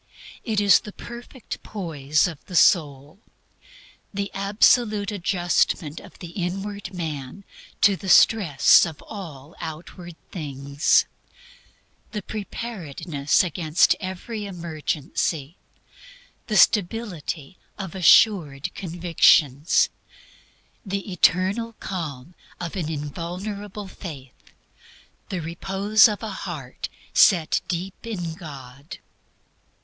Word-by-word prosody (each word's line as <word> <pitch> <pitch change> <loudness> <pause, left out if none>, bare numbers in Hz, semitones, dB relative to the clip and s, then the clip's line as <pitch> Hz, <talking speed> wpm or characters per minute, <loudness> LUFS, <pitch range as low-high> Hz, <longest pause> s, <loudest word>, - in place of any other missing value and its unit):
It 220 -3 0
is 205 -1 +6
the 210 - -10
perfect 240 +1 -9
poise 155 -7 -1
of 160 -4 -8
the 185 - -8
soul; 150 -1 +3 0.9
the 200 0 -3
absolute 205 +1 +3
adjustment 175 -5 0
of - - -15
the 175 -2 -9
inward 195 +3 -4
man 160 -1 -6 0.4
to 200 -2 +5
the 190 0 -7
stress 180 -9 +6
of 160 -3 -4
all 160 -8 -9
outward 165 +2 -8 0.2
things; 140 -3 +1 1.1
the 210 -2 -4
preparedness 175 - -2
against 170 -1 +2
every 205 +3 -5
emergency; 160 -3 -3 0.9
the 215 -2 +1
stability 185 -6 +1 0.2
of 190 -4 -6
assured 175 -6 +4
convictions; 165 -4 +3 0.9
the 200 -1 -4
eternal 190 +6 +2
calm 165 - -6 0.3
of 175 0 -5
an 170 -5 -2
invulnerable 185 +7 -5
faith; 145 -10 -11 0.8
the 185 -3 -3
repose 195 +7 +3
of 210 0 -4
a 220 - -4
heart 155 -9 -6 0.2
set 170 -6 +4
deep 185 +5 -5
in 175 -7 -4
God. 140 -3 -10
180 Hz, 95 wpm, -24 LUFS, 155-200 Hz, 1.1 s, is